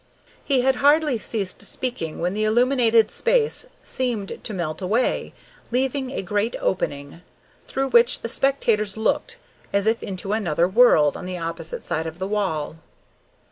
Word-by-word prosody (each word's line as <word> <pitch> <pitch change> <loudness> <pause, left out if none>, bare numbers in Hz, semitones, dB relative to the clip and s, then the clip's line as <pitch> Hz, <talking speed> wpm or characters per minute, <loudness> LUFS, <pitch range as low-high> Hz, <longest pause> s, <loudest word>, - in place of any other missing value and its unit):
He 270 -3 +2
had 265 0 +2
hardly 290 -3 +3
ceased 200 -4 -3
speaking 235 -12 -4
when 175 +2 -1
the 215 +1 -1
illuminated 230 0 +3
space 475 0 +1 0.2
seemed 235 -6 -3
to - - -5
melt 170 -5 -4
away, 220 +7 0 0.4
leaving 265 +2 -1
a 260 - -4
great 205 +5 -1
opening, 145 -3 -3 0.5
through 270 0 -2
which 240 0 +4
the - - -3
spectators 230 -6 +1
looked 455 - -1 0.3
as 200 0 +1
if 225 +1 +1
into 195 +1 -4
another 175 -6 +1
world 185 -8 +5
on 180 - -7
the 185 -1 -4
opposite 165 -1 -5
side 160 +1 -2
of 160 +1 -7
the 190 - -3
wall. 185 -7 -2
215 Hz, 150 wpm, -23 LUFS, 180-255 Hz, 0.5 s, world